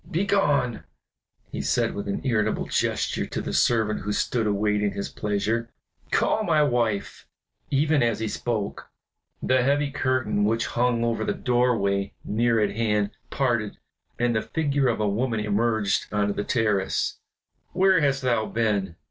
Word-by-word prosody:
"Begone!" 155 Hz, -, +1 dB, 0.7 s
he -, -, -3 dB
said -, -, +1 dB
with 100 Hz, -, -5 dB
an 100 Hz, -, -2 dB
irritable 110 Hz, -4 st, 0 dB
gesture -, -, -1 dB
to -, -, -4 dB
the -, -, -4 dB
servant 110 Hz, -3 st, +2 dB
who 105 Hz, -, -4 dB
stood 110 Hz, +2 st, 0 dB
awaiting 105 Hz, 0 st, +1 dB
his 100 Hz, -, -4 dB
pleasure. 110 Hz, +3 st, -1 dB, 0.4 s
"Call 220 Hz, -, +1 dB
my 155 Hz, -6 st, +3 dB
wife." 120 Hz, -7 st, -1 dB, 0.4 s
Even 150 Hz, +1 st, +2 dB
as 115 Hz, -2 st, +2 dB
he 110 Hz, -, -2 dB
spoke, 110 Hz, -3 st, -3 dB, 0.5 s
the 130 Hz, 0 st, +3 dB
heavy 140 Hz, +2 st, +1 dB
curtains 130 Hz, -7 st, 0 dB
which 115 Hz, +2 st, +1 dB
hung 120 Hz, -1 st, 0 dB
over 115 Hz, -2 st, 0 dB
the -, -, -1 dB
doorway 110 Hz, -6 st, +1 dB
near 115 Hz, +1 st, +1 dB
at 100 Hz, -1 st, 0 dB
hand, 105 Hz, -2 st, +1 dB, 0.2 s
parted, 120 Hz, -6 st, -1 dB, 0.4 s
and 120 Hz, -1 st, +1 dB
the 110 Hz, -, +2 dB
figure 145 Hz, -2 st, 0 dB
of 115 Hz, -3 st, 0 dB
a 105 Hz, -, +1 dB
woman 110 Hz, +3 st, 0 dB
emerged 105 Hz, -1 st, 0 dB
onto 105 Hz, -1 st, +1 dB
the 105 Hz, -, -2 dB
terrace. 105 Hz, -5 st, 0 dB, 0.5 s
"Where 190 Hz, -2 st, +4 dB
hast 135 Hz, -2 st, +1 dB
thou 120 Hz, -4 st, +1 dB
been?" 105 Hz, -6 st, -1 dB
115 Hz, 150 wpm, -25 LUFS, 105-130 Hz, 0.7 s, Where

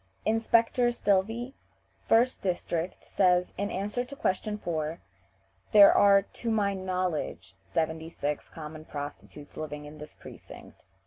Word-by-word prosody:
Inspector 230 Hz, +2 st, +2 dB
Silvey, 225 Hz, +5 st, 0 dB, 0.6 s
1st 240 Hz, +3 st, +3 dB
district, 175 Hz, -2 st, -2 dB
says, 180 Hz, -2 st, +2 dB
in 200 Hz, +1 st, -2 dB
answer 205 Hz, +6 st, -2 dB
to 265 Hz, +3 st, -10 dB
question 210 Hz, -6 st, -1 dB
4, 160 Hz, -4 st, -3 dB, 0.7 s
"There 205 Hz, -1 st, +9 dB
are 200 Hz, -1 st, +6 dB
to 230 Hz, +4 st, -6 dB
my 205 Hz, -3 st, +1 dB
knowledge 180 Hz, -, -3 dB
seventy 160 Hz, +3 st, -2 dB
six 150 Hz, -3 st, -4 dB
common 155 Hz, -1 st, -9 dB
prostitutes 145 Hz, 0 st, -8 dB
living 150 Hz, -1 st, -6 dB
in 150 Hz, +1 st, -11 dB
this 150 Hz, -, -10 dB
precinct." -, -, -13 dB
185 Hz, 125 wpm, -28 LUFS, 155-215 Hz, 0.7 s, There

